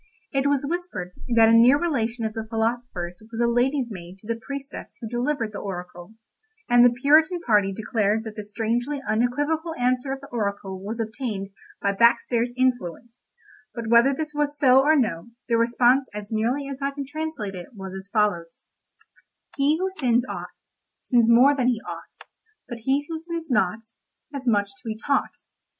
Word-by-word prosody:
It 275 0 +1
was 285 -1 +1
whispered 340 - -4 0.2
that 225 -1 +7
a - - +5
near 240 +5 +7
relation 240 -8 -1
of 220 - -3
the 225 0 -5
philosopher's 225 -6 -2
was 225 - -5
lady's 245 +2 +1
maid 180 -1 -9
to 210 - -17
the 230 0 -3
priestess 280 0 -7
who 225 - -6
delivered 240 0 -1
the 200 - -6
oracle, 180 +1 -7 0.5
and 240 0 +6
the 245 - +8
Puritan 315 +5 +5
party 210 - +3
declared 215 +1 0
that 220 -2 -8
the 210 - -5
strangely 235 +7 -2
unequivocal 290 +9 0
answer 250 +2 0
of 270 - -3
the 280 - -12
oracle 200 -4 -3
was 220 +3 -5
obtained 220 -3 -4 0.3
by 200 - +3
backstairs 235 +2 +3
influence; 240 -2 -1 0.5
but 230 -2 -4
whether 235 +4 +6
this 300 +2 -4
was 295 0 -1
so 265 -2 +6
or 305 +3 +4
no, 220 - 0 0.2
the 235 - +2
response 240 +3 +3
as 210 0 -6
nearly 240 +6 0
as 275 0 -7
I 275 - +1
can 280 0 -6
translate 290 -8 -3
it 180 +5 -9
was 190 -1 -7
as 190 +1 -8
follows: 175 -6 -1 0.9
"He 290 +3 +3
who 375 +2 -1
sins 250 -8 +1
aught - - -8 0.4
Sins 235 -3 +3
more 255 +5 +6
than 255 -3 +1
he 245 -3 +2
ought; - - -9 0.5
But 240 - -7
he 275 +2 +1
who 325 -1 -4
sins 330 -2 -6
nought 210 0 +1 0.5
Has 270 -2 -6
much 205 -3 +2
to - - -20
be 220 -2 -4
taught. 280 +5 -1
240 Hz, 175 wpm, -24 LUFS, 215-275 Hz, 0.9 s, the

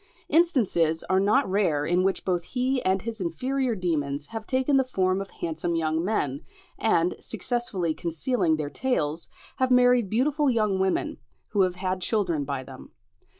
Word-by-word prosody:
Instances 215 - +2
are 190 - +4
not 210 +8 +3
rare 180 -7 +1
in 175 +3 +2
which 190 0 0
both 180 -2 0
he 255 +5 -1
and 190 0 +1
his 225 -2 -5
inferior 250 +8 -1
demons 145 -6 -2
have 225 +3 -7
taken 260 +2 +1
the 265 - +4
form 190 -6 0
of 195 - -7
handsome 165 +1 -3
young 160 0 0
men, 150 -9 -1 0.4
and, 175 -5 +2
successfully 200 -9 -2
concealing 165 - 0
their 150 -2 -4
tails, 165 - -1 0.3
have 260 -1 +1
married 250 -4 +4
beautiful 280 +6 +2
young 215 -5 +1
women, 190 0 0 0.3
who 205 - +1
have 185 -1 +2
had 185 0 -2
children 175 -8 0
by 135 -2 -3
them. - - -12
190 Hz, 160 wpm, -26 LUFS, 165-245 Hz, 0.4 s, are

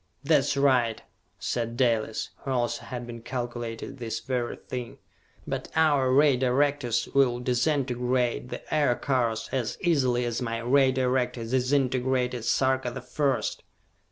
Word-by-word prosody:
"That's 140 -1 +2
right," 125 -5 +3 0.4
said 115 -1 -3
Dalis, 115 -4 0
who 135 - -7
also 120 -2 -1
had 120 -1 -5
been 120 -1 -8
calculating 120 +1 -5
this 115 -2 -4
very 120 0 -2
thing, 125 -2 -7 0.5
"but - - -4
our 145 -5 +3
Ray 140 0 +5
Directors 130 -2 +1
will 130 -3 +3
disintegrate 125 -1 0
the - - -6
Aircars 120 -5 +1
as 125 -4 -2
easily 130 -9 +2
as 120 +1 -2
my 115 -2 -2
Ray 130 +3 +3
Director 125 -2 0
disintegrated 125 -1 0
Sarka 130 0 +1
the 125 +2 -6
First!" 140 0 -1
125 Hz, 130 wpm, -27 LUFS, 120-135 Hz, 0.5 s, Ray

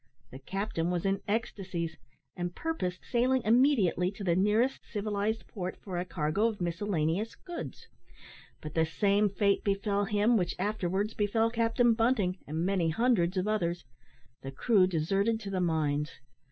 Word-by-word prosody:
The 130 - -9
captain 185 +2 -2
was 175 0 -1
in 195 0 +1
ecstasies, 190 -6 -2 0.4
and 175 0 -4
purposed 185 - -3
sailing 255 +1 +2
immediately 220 - +3
to 200 - -8
the 175 -3 +2
nearest 210 +7 +2
civilised 210 +1 -2
port 185 -3 -5
for 185 -3 -5
a 180 - -2
cargo 170 +4 0
of 220 -3 -4
miscellaneous 175 +2 -1
goods; 350 -2 -8 0.7
but 155 -1 -7
the 160 - +3
same 200 +4 +2
fate 200 0 +1
befell 200 0 0
him 215 +3 +3
which 180 -3 -1
afterwards 200 +1 -1
befell 225 +2 +1
Captain 230 +1 +3
Bunting, 225 -6 +1
and 160 +3 -2
many 185 -4 +1
hundreds 190 -2 +2
of 185 +2 0
others 175 -6 -1 0.6
the 135 - -6
crew 190 - +3
deserted 195 +6 +1
to 200 -2 -6
the 185 -1 0
mines. 155 -3 0
195 Hz, 155 wpm, -30 LUFS, 175-220 Hz, 0.7 s, immediately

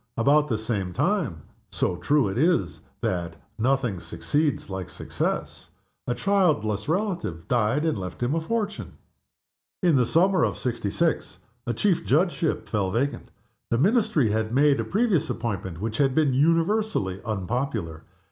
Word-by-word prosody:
About 145 +5 +4
the 115 - 0
same 105 -5 -2
time 155 - 0 0.3
so - - 0
true 145 +5 +2
it 95 - -3
is 165 +7 +1 0.2
that 85 -2 -2 0.2
"nothing 125 -5 +1
succeeds 145 - -1
like 95 -2 -5
success" - - -3 0.4
a 120 - 0
childless 150 - +1
relative 170 - -2
died 120 +6 +1
and 155 -10 0
left 90 +5 -5
him 125 +4 +1
a 165 - 0
fortune. 210 +3 -3 0.9
In 170 -4 +4
the 125 -2 +2
summer 185 +5 +3
of - - 0
'sixty 120 -5 -2
six 165 +9 -1 0.3
a 120 - 0
Chief 190 - +1
Judgeship 170 +2 +1
fell 100 -4 0
vacant. 130 +8 -2 0.4
The 115 - +1
Ministry 185 - +3
had 110 +1 -1
made 140 +2 +4
a - - +1
previous 195 - +1
appointment 95 -7 -3
which 110 +2 -3
had 135 -2 +2
been 150 -4 +3
universally 165 - +1
unpopular. 110 - -3
130 Hz, 145 wpm, -25 LUFS, 105-165 Hz, 0.9 s, About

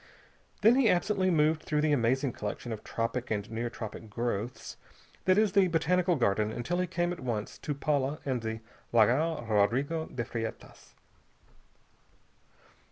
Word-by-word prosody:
Then 225 +4 +6
he 255 -5 +4
absently 185 +1 +2
moved 155 -2 +3
through 150 -1 0
the 155 0 +2
amazing 130 0 +2
collection 105 +3 -5
of 110 - -5
tropic 115 +2 -3
and 105 -1 -2
near 115 +1 -2
tropic 110 -1 -8
growths 115 +1 -3 0.5
that 185 +1 +4
is 215 -2 +4
the 195 -1 +4
Botanical 175 +2 +2
Garden 105 -4 +1
until 175 +11 -2
he 180 - 0
came 175 0 -1
at 175 - -9
once 115 -5 -4
to 145 - -3
Paula 140 0 0
and 130 -3 -1
the 110 0 -4 0.3
Lagoa 130 +7 +3
Rodrico 130 +10 +1
de 120 -2 -4
Freitas. 115 -2 -7
135 Hz, 150 wpm, -30 LUFS, 115-170 Hz, 0.5 s, Then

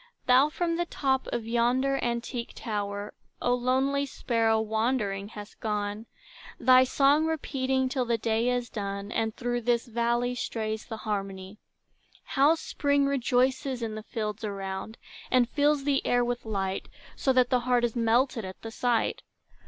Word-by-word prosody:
Thou 260 +4 +5
from 335 +1 -1
the 345 0 -1
top 265 -4 0
of 230 - -2
yonder 250 +4 +2
antique 235 0 -3
tower, 205 -2 -4 0.3
O 245 - +1
lonely 265 +3 +1
sparrow, 225 -4 +1
wandering, 220 -2 -1
hast 210 -1 -10
gone, 210 0 -3 0.5
Thy 255 0 +7
song 285 +4 +3
repeating 265 -4 0
till 255 -1 -1
the 235 -1 +1
day 225 +2 +1
is 245 -1 0
done, 200 -1 -5
And 225 -2 -1
through 240 0 -2
this 235 0 +1
valley 235 +1 0
strays 220 -3 -3
the 225 - -5
harmony. 195 -1 -4 0.6
How 290 +4 +3
Spring 285 -3 +1
rejoices 260 -1 +1
in 220 -1 -3
the 215 - -5
fields 215 -1 -4
around, 195 +1 -5 0.3
And 250 -2 +4
fills 290 +2 +2
the 275 -1 +1
air 245 0 +2
with 245 -1 -3
light, 195 -3 -2 0.3
So 270 - +1
that 255 -1 +3
the 250 - +4
heart 245 0 +1
is 240 -1 0
melted 235 +1 +2
at 190 0 -8
the 225 - -6
sight! 245 - 0
240 Hz, 155 wpm, -28 LUFS, 220-260 Hz, 0.6 s, Thy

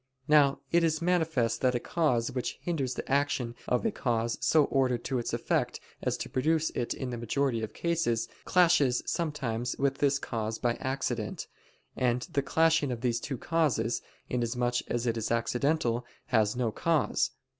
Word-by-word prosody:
Now 145 -2 +4
it 170 0 +4
is 160 -1 +2
manifest 160 -10 +1
that 125 -1 +2
a - - +1
cause 125 -6 0
which 125 -2 -3
hinders 140 -8 -2
the - - -5
action 135 -4 0
of 125 - +1
a 225 - +2
cause 115 - -1
so 145 +3 +5
ordered 130 -3 +1
to 130 -2 -1
its 120 - -3
effect - - -1 0.2
as - - -1
to - - -4
produce 160 +4 +1
it 120 - -2
in 130 -2 -4
the 120 - -4
majority 120 0 0
of 110 - -5
cases, 155 -10 0 0.2
clashes 165 -9 +3
sometimes 130 -8 -2
with 135 0 0
this 140 -1 +3
cause 110 -4 -3
by 120 -1 +1
accident: 125 -5 -2 0.5
and 125 -1 +1
the 140 - +2
clashing 160 0 +2
of 120 -2 -4
these 120 -2 +1
two 135 +1 -4
causes, 135 -7 0 0.3
inasmuch 120 0 0
as 120 0 -1
it 115 -1 0
is 115 - -2
accidental, 120 +1 +1 0.3
has 110 -3 +2
no 120 -3 0
cause. 165 +5 +1
125 Hz, 170 wpm, -29 LUFS, 120-150 Hz, 0.5 s, so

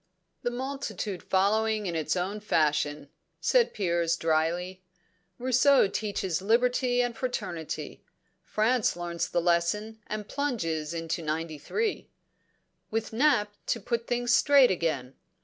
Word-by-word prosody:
"The - - 0
multitude 240 -7 -4
following 215 +2 +1
in 175 -3 -2
its 155 0 0
own 190 +4 -2
fashion," 150 -6 0 0.3
said - - +3
Piers 170 -4 0
drily. 170 +4 0 0.6
"Rousseau 260 0 +4
teaches 195 -4 -2
liberty 245 +3 +2
and 240 -1 -2
fraternity; 200 - -4 0.4
France 220 0 +1
learns 170 -1 -3
the - - +1
lesson 175 +6 0
and 210 -1 -4
plunges 170 - -2
into 165 +1 -3
'93." 160 - -3 0.8
"With 225 0 -3
Nap 220 -5 +3
to 230 - 0
put 235 +2 -2
things 245 0 +1
straight 275 -2 +6
again. 155 -8 -1
205 Hz, 115 wpm, -28 LUFS, 170-240 Hz, 0.8 s, straight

